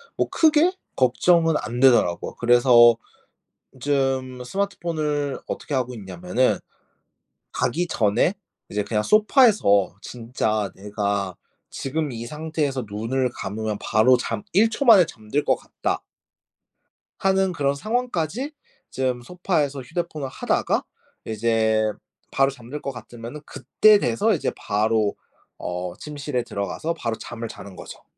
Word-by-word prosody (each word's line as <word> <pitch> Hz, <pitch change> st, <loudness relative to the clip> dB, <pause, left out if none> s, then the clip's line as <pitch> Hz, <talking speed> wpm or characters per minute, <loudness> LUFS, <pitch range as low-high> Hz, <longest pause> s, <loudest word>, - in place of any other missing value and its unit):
뭐 -, -, 0 dB
크게 320 Hz, +2 st, +4 dB, 0.2 s
걱정은 165 Hz, +6 st, +3 dB
안 120 Hz, +3 st, -4 dB
되더라고. 120 Hz, -10 st, +3 dB
그래서 120 Hz, -1 st, +6 dB, 0.8 s
좀 130 Hz, -2 st, -1 dB
스마트폰을 155 Hz, -5 st, -2 dB
어떻게 145 Hz, -, -5 dB
하고 125 Hz, -1 st, -1 dB
있냐면은 95 Hz, +3 st, -1 dB, 0.9 s
가기 175 Hz, +2 st, -1 dB
전에 110 Hz, -, +2 dB, 0.4 s
이제 105 Hz, 0 st, -1 dB
그냥 105 Hz, -2 st, 0 dB
소파에서 210 Hz, -, +4 dB
진짜 110 Hz, -4 st, -2 dB
'내가 100 Hz, -2 st, -2 dB, 0.3 s
지금 145 Hz, +1 st, -3 dB
이 115 Hz, 0 st, -6 dB
상태에서 150 Hz, -4 st, -2 dB
눈을 120 Hz, +5 st, -1 dB
감으면 105 Hz, +1 st, -3 dB
바로 115 Hz, +4 st, +4 dB
잠 195 Hz, +11 st, -3 dB
1 215 Hz, +5 st, +5 dB
초 275 Hz, +5 st, -2 dB
만에 205 Hz, -7 st, +8 dB
잠들 140 Hz, -1 st, -3 dB
것 -, -, +2 dB
같다.' -, -, -3 dB, 1.2 s
하는 190 Hz, -1 st, +2 dB
그런 140 Hz, -4 st, 0 dB
상황까지 230 Hz, -, -2 dB, 0.4 s
좀 130 Hz, -2 st, -1 dB
소파에서 150 Hz, -3 st, -1 dB
휴대폰을 155 Hz, 0 st, -4 dB
하다가 -, -, 0 dB, 0.4 s
이제 110 Hz, -1 st, +1 dB, 0.4 s
바로 135 Hz, 0 st, +3 dB
잠들 130 Hz, +3 st, -9 dB
것 140 Hz, -, -3 dB
같으면은 120 Hz, +2 st, -9 dB
그때 200 Hz, -, +4 dB
돼서 205 Hz, -, +1 dB
이제 165 Hz, -, -1 dB
바로 105 Hz, 0 st, +1 dB, 0.4 s
어 90 Hz, 0 st, -4 dB
침실에 145 Hz, -4 st, -4 dB
들어가서 120 Hz, +11 st, -3 dB
바로 115 Hz, -7 st, -3 dB
잠을 115 Hz, -1 st, -6 dB
자는 100 Hz, -3 st, -10 dB
거죠. -, -, -11 dB
130 Hz, 260 characters per minute, -23 LUFS, 110-160 Hz, 1.2 s, 만에